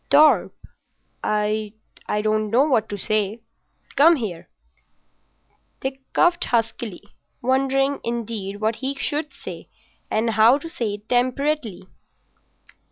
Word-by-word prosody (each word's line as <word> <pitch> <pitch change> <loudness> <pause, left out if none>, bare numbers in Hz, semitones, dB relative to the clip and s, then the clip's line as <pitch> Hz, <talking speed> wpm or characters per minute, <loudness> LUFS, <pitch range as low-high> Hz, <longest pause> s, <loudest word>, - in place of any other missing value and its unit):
"Torp, 300 +2 +5 0.7
I 210 0 0 0.3
don't 215 0 0
know 240 +6 +4
what 250 -7 +1
to 205 - -4
say. 215 +2 0 0.5
Come 330 +4 +7
here." 205 - -5 1.3
Dick 265 0 -4
coughed 350 0 +3
huskily, 225 -4 -2 0.4
wondering, 270 +2 +1
indeed, 225 -4 -4
what 220 +1 0
he 270 +1 -2
should 295 +2 -2
say, - - -9 0.4
and 225 +1 +1
how 225 +4 +5
to 295 - -8
say 230 -10 -3
it 210 +1 -15
temperately. 250 -5 0
235 Hz, 110 wpm, -23 LUFS, 215-275 Hz, 1.3 s, Come